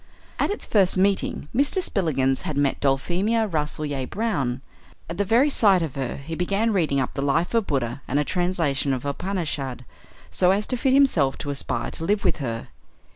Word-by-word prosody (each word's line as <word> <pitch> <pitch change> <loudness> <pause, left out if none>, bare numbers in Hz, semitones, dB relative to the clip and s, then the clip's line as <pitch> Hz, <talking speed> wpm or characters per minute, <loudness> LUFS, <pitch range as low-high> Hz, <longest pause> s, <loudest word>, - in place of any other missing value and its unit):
At - - +2
its 410 - -2
first 195 -4 +3
meeting 195 -5 +1
Mr. 285 +8 +2
Spillikins 145 - 0
had 150 - -4
met 140 -1 +1
Dulphemia 180 +12 +1
Rasselyer 150 -5 -2
Brown. 145 - -2 0.5
At 170 +3 -7
the - - +3
very 235 +8 +3
sight 195 -8 +4
of 155 -5 -4
her 135 -3 -3
he 140 +4 -7
began 200 +6 0
reading 155 -7 +1
up 130 - -2
the 140 - -3
life 150 +7 0
of 230 -3 +1
Buddha 130 -1 -2
and 140 - 0
a 150 - +3
translation 165 -6 0
of 130 - -3
the 145 - -2
Upanishads 145 -7 -3 0.5
so 180 - +3
as 200 +3 +2
to 255 - -1
fit 260 +2 +1
himself 185 - +3
to 145 - -4
aspire 120 -4 -1
to - - -6
live 205 +3 +1
with - - +1
her. 115 -6 -4
165 Hz, 190 wpm, -24 LUFS, 140-200 Hz, 0.5 s, sight